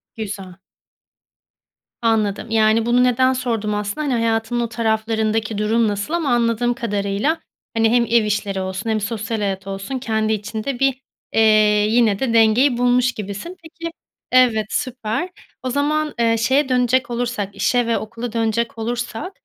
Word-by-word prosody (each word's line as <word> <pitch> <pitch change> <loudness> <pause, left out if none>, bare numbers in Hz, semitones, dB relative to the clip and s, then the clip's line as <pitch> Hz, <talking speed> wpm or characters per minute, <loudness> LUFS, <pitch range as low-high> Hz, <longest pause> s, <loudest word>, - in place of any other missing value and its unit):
Güzel. 195 -4 -7 1.4
Anladım, 220 -1 0
yani, 220 0 +3
bunu 245 +1 +3
neden 255 +1 +3
sordum 230 -5 -2
aslında, 210 +8 -3
hani, 270 - +1
hayatının 230 0 0
o 235 -1 -1
taraflarındaki 220 -1 -1
durum 220 +2 +2
nasıl 205 +8 -3
ama 330 -5 0
anladığım 240 0 +1
kadarıyla, 210 +5 -1 0.4
hani, 225 0 +4
hem 240 0 +3
ev 230 -1 +3
işleri 205 -2 -1
olsun 190 +4 -4
hem 220 -1 +1
sosyal 215 +1 -3
hayat 195 -2 -3
olsun, 195 +7 -4
kendi 220 -3 0
içinde 220 +4 -4
bir, 270 -1 +2 0.3
eee, 225 - +3 0.5
yine, 220 -3 +3
de 255 -4 0
dengeyi 230 +4 +4
bulmuş 245 0 +3
gibisin. 210 - -7
Peki 330 +1 -7 0.4
Evet, 245 -4 +4
süper. 255 +7 -2 0.3
O 255 - -2
zaman, 300 +3 0
eee, 230 -1 +3
şeye 265 +5 +2
dönecek 250 0 +2
olursak, 235 -5 -3
işe 245 +3 +1
ve 230 - +1
okula 230 +1 -6
dönecek 230 0 -1
olursak, 235 - -4
230 Hz, 150 wpm, -20 LUFS, 215-245 Hz, 1.4 s, hani